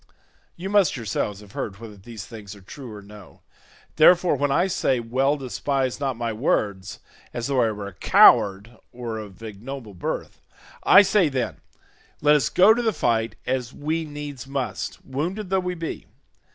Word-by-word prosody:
You 180 +3 -6
must 200 -7 +3
yourselves 105 -2 -3
have 105 -2 -15
heard 100 0 -5
whether 110 -1 -10
these 105 +1 -10
things 105 -3 -10
are 100 - -15
true 125 +6 -10
or 105 -1 -10
no; 100 -3 -14 0.6
therefore 175 +1 +6
when 145 +1 0
I 175 +6 +3
say 155 -9 0
well 130 +5 +1
despise 135 0 -2
not 135 -4 -2
my 115 -1 -2
words 105 -5 -1 0.3
as 120 - -3
though 135 -2 +1
I 115 - +3
were 105 -2 -5
a 100 - -8
coward 100 +6 +5
or 120 -2 -5
of 105 0 -11
ignoble 110 +2 -8
birth. 90 - -5 0.4
I 205 - +8
say, 195 -5 +3
then, 130 -3 -2 0.6
let 150 0 +5
us 140 -5 +2
go 195 +4 +6
to 240 - -1
the 225 -2 +1
fight 115 -6 0
as 125 -1 -2
we 160 +3 -2
needs 145 -3 -7
must, 130 -8 -4
wounded 180 +9 -4
though 190 - +3
we 180 -1 -3
be. 165 -2 -6
125 Hz, 175 wpm, -24 LUFS, 110-150 Hz, 0.6 s, I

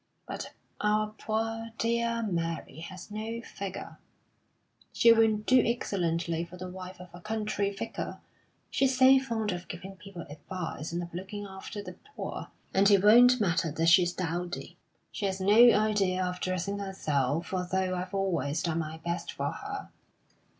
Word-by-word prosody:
But - - -6 0.3
our 210 0 +2
poor, 225 +1 -2
dear 235 0 0
Mary 165 -6 -3
has 185 +4 -9
no 220 +2 -4
figure. 195 -4 -7 0.9
She 230 0 +6
will 225 -1 +4
do 250 +4 +4
excellently 170 -7 0
for 175 +1 -10
the 185 0 -6
wife 185 0 -8
of 180 0 -10
a 175 - -11
country 215 -1 -1
vicar. 200 -1 -5 0.5
She's 265 -1 +2
so 265 +1 +8
fond 225 -5 -2
of 175 0 -5
giving 190 +2 -8
people 190 -3 -9
advice, 160 +1 -6
and 175 +1 -2
of 170 - -9
looking 195 +3 -5
after 200 +2 -7
the 180 -2 -9 0.2
poor, - - -5 0.3
and 195 +1 +5
it 200 -2 +5
won't 245 +4 +7
matter 170 -5 +1
that 165 +2 +2
she's 175 +1 +6
dowdy. 175 0 -4 0.4
She 205 - -2
has 190 0 -2
no 215 +5 +7
idea 200 -4 +2
of 180 0 -3
dressing 185 +3 -2
herself, 155 -6 -1
although 185 0 0
I've 185 +1 -4
always 170 -5 0
done 165 -2 0
my 160 0 -4
best 170 0 -2
for 140 +1 -2
her. - - -6
190 Hz, 155 wpm, -29 LUFS, 175-215 Hz, 0.9 s, so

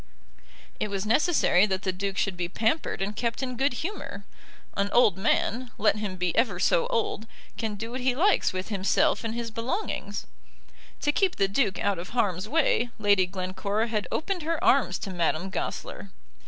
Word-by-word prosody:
It - - 0
was 200 -1 -3
necessary 220 - +4
that 190 -1 -2
the 190 - +1
Duke 195 +1 -3
should 195 -2 0
be 175 -1 -3
pampered 225 - 0
and 205 +2 -3
kept 235 +3 -2
in 255 -1 -3
good 270 +3 +2
humour. 275 - -6 0.5
An 200 0 0
old 225 -6 +5
man, 230 +5 0
let 215 0 +3
him 210 -3 -3
be 180 -2 -1
ever 220 -6 +2
so 170 - +3
old, 225 -1 -1 0.3
can 220 -2 -3
do 225 +3 -6
what 255 +1 -4
he 250 0 +1
likes 385 +8 +3
with 185 +2 -4
himself 195 +1 +2
and 225 0 -3
his 235 -1 -4
belongings. 250 - -3 0.8
To 295 - +2
keep 375 +4 +1
the 195 - +2
Duke 200 0 +1
out 200 -3 0
of 180 - -7
harm's 200 -3 0
way 285 -5 +2
Lady 200 -4 +3
Glencora 190 +4 -2
had 215 -2 -1
opened 360 +3 -1
her 325 +2 -1
arms 245 -9 +4
to 195 - -6
Madame 175 +1 0
Goesler. - - -5
210 Hz, 180 wpm, -27 LUFS, 190-245 Hz, 0.8 s, old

